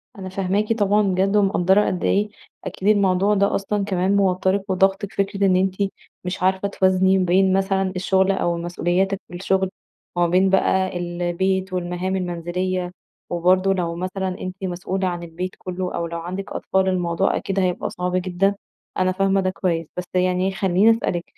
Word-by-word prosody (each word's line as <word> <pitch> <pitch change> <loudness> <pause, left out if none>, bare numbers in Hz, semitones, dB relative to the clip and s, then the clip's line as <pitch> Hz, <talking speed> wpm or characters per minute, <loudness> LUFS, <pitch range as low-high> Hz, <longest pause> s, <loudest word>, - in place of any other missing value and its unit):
أنا 190 -2 -7
فاهماكِ 195 +3 0
طبعًا 205 -1 +2
بجد، 195 0 +1
ومقدرة 195 0 +3
قد 180 - -2
إيه 210 +1 +2 0.4
أكيد 190 - -4
الموضوع 200 -1 +3
ده 200 0 +2
أصلًا 200 +1 -1
كمان 190 0 +1
موتّرِك 190 0 +1
وضاغطِك. 195 +2 +1
فكرة 200 0 0
إن 185 -1 +4
أنتِ 185 0 +1 0.5
مش 180 0 -4
عارفة 190 +1 +2
توازني 190 -1 +3
بين 185 +1 +3
مثلًا 190 0 +1
الشغل 190 +1 +2
أو 175 -3 0
مسؤولياتِك 175 +3 -1
في - - -15
الشغل، 190 +1 0 0.5
وما 175 0 +2
بين 185 +3 +3
بقى 190 -1 +2
البيت 175 +2 -1
والمهام 180 +1 -2
المنزلية، 180 0 -2 0.4
وبرضه 185 +2 +2
لو 170 -3 -2
مثلًا 185 +2 -3
أنتِ 185 0 -5
مسؤولة 185 +1 -2
عن 175 -1 -3
البيت 175 +2 -5
كله، 185 0 -4
أو 170 - -2
لو 170 0 -5
عندِك 185 +3 -6
أطفال 190 0 0
الموضوع 180 0 0
أكيد 195 0 -2
هيبقى 180 -2 0
صعب 180 0 -3
جدًا. 185 +2 +1 0.4
أنا 185 0 +2
فاهمة 195 +1 +1
ده 185 - 0
كويس. 170 -4 -2
بس 180 - -2
يعني 185 +1 +1
خلّيني 190 +3 +3
أسألِك 180 -6 -1
185 Hz, 165 wpm, -22 LUFS, 180-195 Hz, 0.5 s, إن